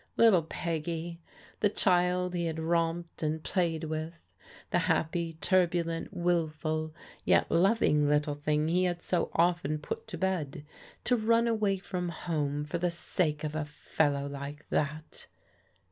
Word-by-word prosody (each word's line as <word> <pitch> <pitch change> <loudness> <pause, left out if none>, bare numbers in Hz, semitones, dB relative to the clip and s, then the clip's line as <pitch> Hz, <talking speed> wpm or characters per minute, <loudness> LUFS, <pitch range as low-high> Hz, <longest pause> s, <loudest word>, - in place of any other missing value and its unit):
Little 220 -7 +6
Peggy, 165 +1 -4 0.4
the 205 - +3
child 180 -2 +2
he 175 -1 -1
had 160 -1 -3
romped 165 +1 -1
and 155 0 -1
played 170 -4 0
with; 160 +1 -5 0.4
the - - +3
happy, 165 +1 0
turbulent, 170 -1 +1
wilful, 160 -3 -1 0.3
yet - - +3
loving 170 -5 +3
little 150 0 +2
thing 150 +1 0
he 180 +3 +2
had 175 -1 -2
so 175 -2 0
often 170 -3 +2
put 150 - -6
to 190 -6 -6
bed, 160 -6 -2 0.4
to 250 - +3
run 230 +1 +3
away 215 -4 +1
from 180 -2 -4
home 150 -3 -2
for 170 +3 -3
the 175 +1 +1
sake 170 -2 -1
of 150 -1 -2
a 155 0 -1
fellow 145 -1 -1
like 140 +1 -7
that 155 +1 -3
165 Hz, 145 wpm, -30 LUFS, 155-180 Hz, 0.4 s, Little